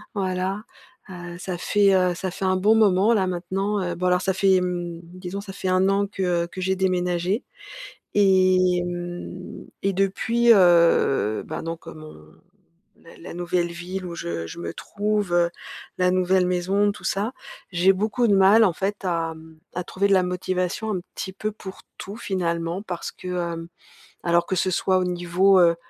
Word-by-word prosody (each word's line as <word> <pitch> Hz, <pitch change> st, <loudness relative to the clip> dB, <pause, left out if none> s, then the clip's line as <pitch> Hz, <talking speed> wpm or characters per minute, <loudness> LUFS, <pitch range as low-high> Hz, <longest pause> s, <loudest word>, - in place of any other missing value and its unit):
Voilà. 190 Hz, +1 st, -2 dB, 0.5 s
Heu, 175 Hz, -1 st, -8 dB
ça 180 Hz, 0 st, -5 dB
fait, 200 Hz, +2 st, +3 dB
heu, 180 Hz, -2 st, +2 dB
ça 185 Hz, +1 st, -4 dB
fait 190 Hz, -, -4 dB
un 185 Hz, 0 st, +2 dB
bon 205 Hz, +4 st, +4 dB
moment, 210 Hz, 0 st, +4 dB
là, 195 Hz, -4 st, +2 dB
maintenant, 190 Hz, +3 st, -2 dB
heu 175 Hz, -1 st, -3 dB
bon 180 Hz, +2 st, -3 dB
alors 180 Hz, 0 st, +2 dB
ça 190 Hz, +1 st, 0 dB
fait, 190 Hz, -1 st, +3 dB
mmh, 175 Hz, -2 st, -3 dB
disons 180 Hz, +3 st, -7 dB
ça 200 Hz, -1 st, -9 dB
fait 190 Hz, -, -5 dB
1 185 Hz, +1 st, +3 dB
an 200 Hz, +1 st, +1 dB
que 180 Hz, -3 st, -1 dB
que 185 Hz, -, -8 dB
j'ai 190 Hz, +1 st, +1 dB
déménagé, 180 Hz, +3 st, 0 dB, 0.7 s
et 185 Hz, -2 st, +4 dB
mmh, 175 Hz, +1 st, -6 dB, 0.2 s
et 195 Hz, -, +1 dB
depuis, 225 Hz, +5 st, +3 dB
heu, 170 Hz, -, +4 dB
ben -, -, -5 dB
donc, 165 Hz, 0 st, -6 dB
heu, -, -, -8 dB
mon 155 Hz, -, -12 dB, 0.7 s
la 165 Hz, -, -16 dB
la 170 Hz, -, -9 dB
nouvelle 175 Hz, 0 st, -1 dB
ville 180 Hz, +2 st, -6 dB
où 170 Hz, -, -6 dB
je 85 Hz, -, -4 dB
je 80 Hz, -, -9 dB
me 85 Hz, -1 st, -5 dB
trouve, 210 Hz, -2 st, -2 dB
heu, 170 Hz, -1 st, +3 dB, 0.5 s
la 180 Hz, 0 st, +3 dB
nouvelle 185 Hz, 0 st, +2 dB
maison, 190 Hz, +3 st, +1 dB
tout -, -, -14 dB
ça, 205 Hz, +5 st, -1 dB, 0.4 s
j'ai 180 Hz, +2 st, +4 dB
beaucoup 215 Hz, +5 st, 0 dB
de 205 Hz, -, +4 dB
mal 195 Hz, +4 st, +6 dB
en 190 Hz, -, +3 dB
fait 200 Hz, +4 st, -2 dB
à, 165 Hz, -3 st, -1 dB
mmh, 160 Hz, 0 st, -15 dB, 0.2 s
à 180 Hz, -, -2 dB
trouver 200 Hz, +3 st, 0 dB
de -, -, +2 dB
la 185 Hz, -, +4 dB
motivation 180 Hz, +3 st, -2 dB
un 185 Hz, -, -2 dB
petit 190 Hz, -, -5 dB
peu 215 Hz, +3 st, -4 dB
pour 195 Hz, -2 st, -10 dB, 0.2 s
tout, 200 Hz, +2 st, -7 dB
finalement. 175 Hz, -4 st, -2 dB
Parce 180 Hz, -5 st, -5 dB
que, 185 Hz, -, -9 dB
hem 170 Hz, -2 st, -3 dB, 0.6 s
alors 170 Hz, 0 st, +2 dB
que 190 Hz, -, -1 dB
ce 185 Hz, +1 st, +1 dB
soit 185 Hz, +1 st, +2 dB
au 185 Hz, -, 0 dB
niveau, 180 Hz, +2 st, +3 dB
heu 170 Hz, -1 st, +5 dB
185 Hz, 185 wpm, -24 LUFS, 175-195 Hz, 0.7 s, mal